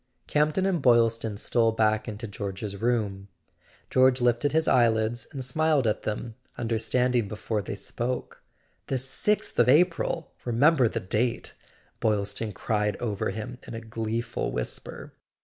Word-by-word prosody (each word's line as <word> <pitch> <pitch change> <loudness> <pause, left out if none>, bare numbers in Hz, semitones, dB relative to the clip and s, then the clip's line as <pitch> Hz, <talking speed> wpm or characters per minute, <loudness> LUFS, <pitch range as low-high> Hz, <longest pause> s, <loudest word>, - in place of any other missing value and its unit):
Camp 150 0 +1
ton 190 - +1
and 185 -5 +1
Boylston 115 -3 +3
stole 115 +1 +2
back 110 0 +1
into 110 +1 -5
George's 100 0 -5
room. 105 -5 0 0.6
George 130 0 +4
lifted 120 +3 +2
his 160 +1 +1
eyelids 115 -1 +2
and 135 -4 -5
smiled 155 0 +2
at 110 - +1
them, 110 +2 -4 0.2
understanding 120 0 +1
before 105 +1 -3
they 100 - -5
spoke. 120 +5 -4 0.5
"The 135 - 0
sixth 135 +11 0
of 120 - +5
April! 165 +1 +2
Remember 130 +3 +4
the - - -2
date!" 115 +6 -1 0.5
Boyl¬ 105 -2 +2
ston 105 +2 -4
cried 105 0 -1
over 105 -5 -2
him 120 +3 -6
in - - -6
a - - -4
gleeful 115 +1 -3
whisper. 60 - -5
115 Hz, 145 wpm, -27 LUFS, 110-130 Hz, 0.6 s, of